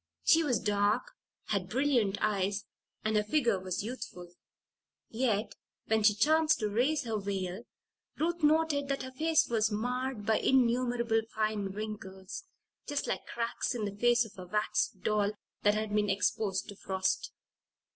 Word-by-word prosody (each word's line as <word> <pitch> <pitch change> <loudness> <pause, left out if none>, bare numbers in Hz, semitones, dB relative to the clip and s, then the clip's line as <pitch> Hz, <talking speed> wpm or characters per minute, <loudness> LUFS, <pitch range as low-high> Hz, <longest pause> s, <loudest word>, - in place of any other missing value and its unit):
She 325 0 +5
was 250 -8 +1
dark, 205 - +1 0.4
had 195 -3 -1
brilliant 240 -6 +2
eyes, 200 -1 0 0.4
and 215 0 +1
her 210 - +3
figure 230 -3 +2
was 185 +1 -3
youthful. 180 -7 -7 0.8
Yet, 225 -3 0 0.3
when 220 0 +2
she 210 -1 +5
chanced 315 +7 +4
to 210 - 0
raise 270 +8 +1
her 225 -3 -2
veil, 195 +1 -3 0.5
Ruth 340 +2 -1
noted 300 -2 +3
that 275 -1 -2
her 260 - -7
face 320 +4 +2
was 220 -2 +2
marred 245 +1 -2
by 220 0 +3
innumerable 240 -2 +2
fine 215 -2 0
wrinkles 195 - -6 0.4
just 290 -1 -1
like - - -3
cracks 235 +2 -2
in 220 -3 -2
the 200 -1 -4
face 240 +2 +3
of 205 -3 -13
a 180 - -8
wax 210 +3 +1
doll 205 +1 0 0.3
that 205 0 +4
had 215 -1 -2
been 210 -1 +2
exposed 195 0 0
to 205 - -8
frost. 190 -1 -1
215 Hz, 155 wpm, -31 LUFS, 205-255 Hz, 0.8 s, She